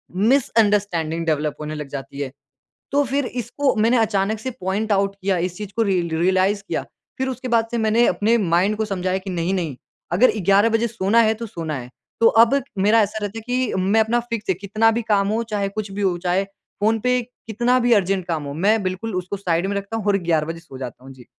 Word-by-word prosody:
Misunderstanding 205 - +2
develop 155 -2 0
होने 150 0 -4
लग 150 -2 -6
जाती 140 0 -7
है। 135 -2 -4 0.6
तो 285 +1 +3
फिर 275 +2 -1
इसको 250 +3 -1
मैंने 230 +3 +3
अचानक 215 -1 +1
से 260 +4 -4
पॉइंट 200 +4 -1
आउट 195 0 +1
किया 190 -1 +1
इस 180 - -15
चीज़ 210 -2 -6
को - - +3
रिय 190 -4 +1 0.2
रियलाइज़ 190 +3 +2
किया। - - -2 0.3
फिर 265 0 -1
उसके 255 0 -5
बाद 230 -2 +2
से 240 - -1
मैंने 225 +1 +3
अपने 210 +6 +2
माइंड 190 +1 +2
को 220 - 0
समझाया 185 -2 -1
कि 190 +1 -7
नहीं-नहीं 175 -4 -1 0.4
अगर 225 +9 +5
11 200 +4 +5
बजे 225 +1 +1
सोना 215 0 +1
है 220 -1 +3
तो 230 +1 -6
सोना 165 -7 -5
है। 125 -2 -7 0.3
तो 230 - +7 0.2
अब 275 +4 +2 0.2
मेरा 210 +4 +4
ऐसा 210 +1 -1
रहता 205 +2 -4
है - - -10
कि 250 -1 0
मैं 200 +4 +3
अपना 225 +2 +1
फ़िक्स 220 -3 -4
है 190 - +3
कितना 205 +4 +2
भी 230 +1 -1
काम 205 -3 +1
हो, 220 +2 0
चाहे 205 -3 -2
कुछ 200 0 -5
भी 200 +1 -4
हो, 185 -3 +1
चाहे 180 +2 0
फ़ोन 210 +2 -2
पे 250 +2 +1 0.3
कितना 240 +3 +2
भी 240 -1 +3
अर्जेंट 195 -3 +1
काम 160 -3 -2
हो। 140 0 -6
मैं 205 +8 +2
बिल्कुल 185 +3 -3
उसको 185 +2 -3
साइड 175 -1 0
में 200 - -2
रखता 200 +3 -4
हूँ 215 - -5
और 200 -1 +4
11 155 -2 +2
बजे 165 0 -5
सो 165 -6 -12
जाता 125 -1 -8
हूँ। 135 - -10
जी। 125 -2 -15
200 Hz, 225 wpm, -21 LUFS, 180-225 Hz, 0.6 s, तो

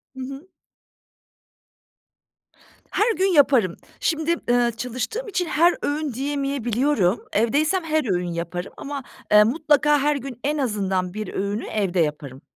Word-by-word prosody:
Hı - - -10
hı. 275 +7 -8 2.4
Her 440 +1 +2
gün 380 - +1
yaparım. 275 - +4 0.2
Şimdi, 320 0 +1
eee, 240 0 +3
çalıştığım 255 - -4
için 365 -3 -1
her 340 +2 +3
öğün 290 -1 -2
diyemeyebiliyorum. 270 -5 0
Evdeysem 300 - +2
her 310 -8 0
öğün 175 -1 -2
yaparım 170 +2 -5
ama, 280 -2 -5 0.3
eee, 210 0 +8
mutlaka 295 +4 +3
her 295 +1 +2
gün 265 -3 -6
en 295 +2 0
azından 195 -8 -1
1 215 +1 -5
öğünü 200 +3 -2
evde 190 -4 -1
yaparım. 150 -4 -2
265 Hz, 130 wpm, -23 LUFS, 205-300 Hz, 2.4 s, eee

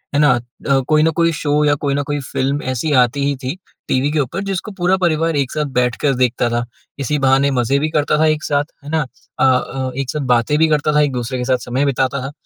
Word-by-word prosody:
है - - +3
ना? 150 -2 +5 0.4
अ, 135 -1 +4
कोई 155 0 +3
न 160 - +3
कोई 165 0 +3
शो 150 -1 0
या 145 - +4
कोई 140 -1 0
न 145 - 0
कोई 145 0 -3
फ़िल्म 140 +1 -2
ऐसी 130 +5 -2
आती 130 +3 0
ही 140 0 0
थी 130 +5 -3 0.3
टीवी 135 +3 +1
के 155 - 0
ऊपर 145 +7 -2
जिसको 195 +1 -4
पूरा 185 -1 +1
परिवार 165 -3 +1
एक 140 -3 0
साथ 150 -1 -1
बैठकर 125 +3 +1
देखता 125 -1 +1
था। 120 0 -1 0.3
इसी 145 +2 -1
बहाने 135 +1 +3
मज़े 130 +1 +1
भी 155 +2 -1
करता 150 -1 +1
था 160 - +4
एक 155 -1 +1
साथ, 145 0 0 0.2
है 145 - -9
ना? 160 0 +1 0.4
अ - - +3
अ, 130 0 0
एक 135 -2 -3
साथ 150 - -2
बातें 120 +5 +1
भी 160 +1 +4
करता 150 0 +1
था। 150 - +5
एक-दूसरे 130 -3 -1
के 125 - -2
साथ 130 0 +2
समय 130 +4 0
बिताता 135 0 0
था। 135 +2 -5
145 Hz, 245 wpm, -18 LUFS, 130-155 Hz, 0.4 s, ना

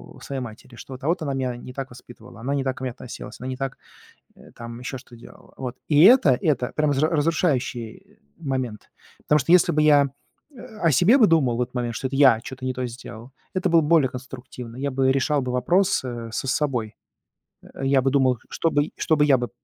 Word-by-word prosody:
у - - -15
своей 135 -1 -5
матери, 120 +1 -10
что 130 - -10
вот 130 - -10
а - - -2
вот 170 +2 +1
она 140 -2 -2
меня 130 -2 -2
не 125 +1 -10
так 135 0 -5
воспитывала, 120 -1 -14
она 135 +4 -2
не 140 - -1
так 130 -1 -2
ко 135 - -8
мне 130 - -2
относилась, 120 +1 -10
она 125 - -6
не 130 - -4
так, 135 -1 -4 0.6
э, - - -17
там, 115 0 -9
еще 130 +1 -5
что 125 -1 -15
делала. 115 - -16
Вот, 130 -1 -6
и 150 -1 +5
это 190 - +6
это 130 -6 0
прямо 150 -1 +2
зря 150 +3 +2
разрушающий, 145 -8 0
э, - - -27 0.2
момент. 130 -7 -4 0.3
Потому 150 - +3
что 135 +6 +1
если 175 -1 +5
бы 155 - +1
я, 145 -2 +5 0.5
э, - - -18 0.2
о 165 - +3
себе 185 - +5
бы 225 - +6
думал 145 -9 +2
в - - +1
этот 125 - -5
момент, 120 -2 -2
что 130 - -3
это 135 - -4
я 135 -5 +6
чё-то 130 0 -9
не 130 - -2
то 125 0 -3
сделал, 115 0 -10 0.2
это 185 -1 0
было 165 0 +5
б 150 - -3
более 155 -6 +4
конструктивно. 125 -2 -9
Я 140 +2 -2
бы 130 0 +1
решал 140 +2 +1
бы 125 - -3
вопрос, 175 +10 +2
э, 120 -2 -5
со 135 - -3
собой. 125 -6 -1 0.7
Э, 135 - -8
я 135 0 +3
бы 135 +1 +1
думал, 130 -3 +2
что 165 - -1
бы 145 0 +1
что 160 - +1
бы 150 - +4
я 140 -3 +5
бы 120 -1 -3
130 Hz, 240 wpm, -23 LUFS, 125-150 Hz, 0.7 s, это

